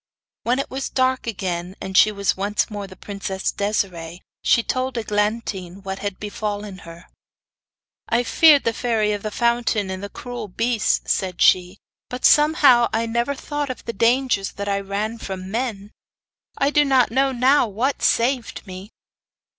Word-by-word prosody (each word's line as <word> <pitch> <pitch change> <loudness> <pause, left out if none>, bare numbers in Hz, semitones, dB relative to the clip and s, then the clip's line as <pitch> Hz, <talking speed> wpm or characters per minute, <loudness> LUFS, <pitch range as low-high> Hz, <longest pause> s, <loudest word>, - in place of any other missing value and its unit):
When 245 +2 0
it 275 - -3
was 265 +1 -3
dark 260 -1 0
again, 180 -3 -3
and 190 - -6
she 215 - +6
was 200 -1 0
once 205 +3 -1
more 205 -1 -5
the 190 - -13
princess 195 -1 -4
Desiree, 180 -5 -3 0.2
she 235 - +3
told 255 +1 -2
Eglantine 210 -4 -2
what 195 0 -5
had 200 -2 -4
befallen 205 -2 -5
her. 170 +2 -12 1.0
'I 235 +1 +2
feared 300 +3 +5
the 230 - 0
Fairy 225 -3 0
of 205 - -4
the 215 - -3
Fountain, 235 -3 0
and 190 0 -5
the 200 - -6
cruel 245 -2 -7
beasts,' 230 +3 0
said 185 -2 -1
she; 180 +1 +3 0.3
'but 250 0 -3
somehow 295 -6 +5
I 225 +1 0
never 235 +4 -1
thought 290 +1 -4
of 255 - -7
the 230 - -4
dangers 230 -2 +1
that 200 0 -5
I 200 0 0
ran 205 +3 -3
from 190 -2 -6
men. 215 -3 -3 0.7
I 280 +1 +2
do 295 0 +4
not 265 -5 +3
know 270 +2 +2
now 260 +1 +3
what 235 +7 -1
saved 245 0 0
me. 190 +1 -9
215 Hz, 165 wpm, -22 LUFS, 195-245 Hz, 1.0 s, she